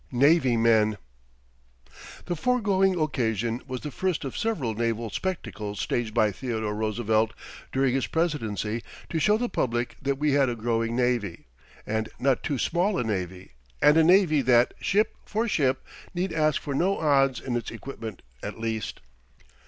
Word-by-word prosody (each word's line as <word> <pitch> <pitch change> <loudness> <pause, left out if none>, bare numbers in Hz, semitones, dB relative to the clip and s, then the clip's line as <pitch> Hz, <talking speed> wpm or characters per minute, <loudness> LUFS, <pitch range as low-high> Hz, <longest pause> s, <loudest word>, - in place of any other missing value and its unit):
NAVY 135 -1 +4
MEN 110 -2 +3 1.3
The 175 - -2
foregoing 195 -3 +2
occasion 120 -6 0
was 130 -2 -4
the 150 - -5
first 185 0 -1
of 135 - -5
several 190 - -1
naval 115 0 -1
spectacles 110 - -4
staged 120 -3 -1
by 110 -1 +3
Theodore 110 -1 -3
Roosevelt 110 0 0 0.4
during 135 -1 +2
his 135 -2 0
presidency 115 - -1 0.3
to 165 - 0
show 210 +6 +4
the 245 +2 -1
public 120 - -1
that 140 0 0
we 150 +1 +1
had 140 -2 +3
a 120 - -2
growing 115 0 -1
navy, 120 -8 0 0.4
and 110 0 -2
not 135 -1 +2
too 145 - -2
small 180 - +1
a - - +1
navy, 95 -4 -4 0.3
and 150 - +6
a 160 - +6
navy 175 -4 +5
that, 120 -1 +4
ship 210 +3 +1
for 225 +2 -1
ship, 135 - +1 0.3
need 175 -1 -1
ask 155 -2 +2
for 140 - -4
no 185 +8 +1
odds 135 -4 +3
in 125 -2 -3
its 120 - -2
equipment 115 -7 -8 0.2
at - - -6
least. 110 -1 -3
130 Hz, 160 wpm, -26 LUFS, 115-160 Hz, 1.3 s, and